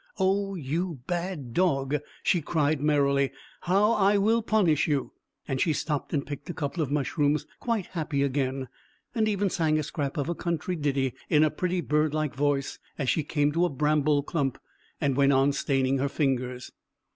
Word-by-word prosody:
"Oh, 195 0 +1
you 165 -1 -3
bad 175 -8 -3
dog," 140 -4 +1 0.3
she 175 - +2
cried 150 -1 0
merrily, 140 -2 +2 0.3
"how 200 +5 +3
I 205 -2 +3
will 220 +3 +3
punish 200 -10 +2
you!" 145 -4 -1 0.3
and 135 -2 -1
she 160 - +2
stooped 150 -1 -2
and 145 -2 -1
picked 145 +1 -7
a 175 - -4
couple 145 +2 -2
of 145 - -1
mushrooms, 145 +1 +1
quite 230 -6 -1
happy 155 -5 -2
again, 135 -1 -1 0.5
and 220 -2 +1
even 200 -2 0
sang 155 -2 +1
a 155 - 0
scrap 145 0 -3
of 145 - -1
a 170 - 0
country 170 +1 -2
ditty 140 -4 0 0.2
in 150 0 +5
a 155 - +3
pretty 180 +3 -1
bird 150 -1 +1
like 155 -2 -1
voice 140 0 -1 0.2
as 135 -4 -1
she 160 - 0
came 145 0 +1
to 170 +3 +1
a - - 0
bramble 150 0 +2
clump, 140 -4 -1 0.4
and 140 -2 +1
went 140 0 +4
on 135 +1 +4
staining 135 -1 +1
her 140 +1 0
fingers. 125 -4 -1
150 Hz, 180 wpm, -27 LUFS, 140-175 Hz, 0.5 s, in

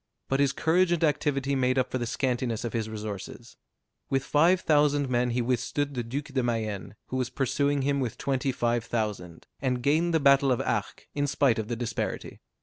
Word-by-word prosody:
But 135 - +1
his 140 -2 +3
courage 170 +5 +2
and 170 -1 +1
activity 140 -2 +1
made 130 -1 +1
up 130 -1 +1
for 130 - -1
the 120 - -2
scantiness 125 -2 -1
of 115 - -4
his 110 -2 -2
resources. 105 -3 -7 0.5
With 135 0 +1
five 165 +6 +3
thousand 145 -2 +3
men 125 0 +2
he 120 0 0
withstood 130 +4 -1
the 125 - -2
Duc 125 +5 -4
de 135 -2 -2
Mayenne, 110 -4 -3
who 130 - -2
was 125 -1 -1
pursuing 140 +2 0
him 140 0 +1
with 125 -5 -3
twenty 135 -1 -1
five 120 -1 0
thousand, 105 -8 -4 0.2
and 125 -2 -1
gained 160 +5 +2
the 165 - +3
battle 140 -1 +5
of 125 - +1
Arques, - - -2
in 145 0 0
spite 135 -4 +2
of 110 - -3
the 120 - -2
disparity. 120 -1 -4
130 Hz, 200 wpm, -27 LUFS, 120-140 Hz, 0.5 s, battle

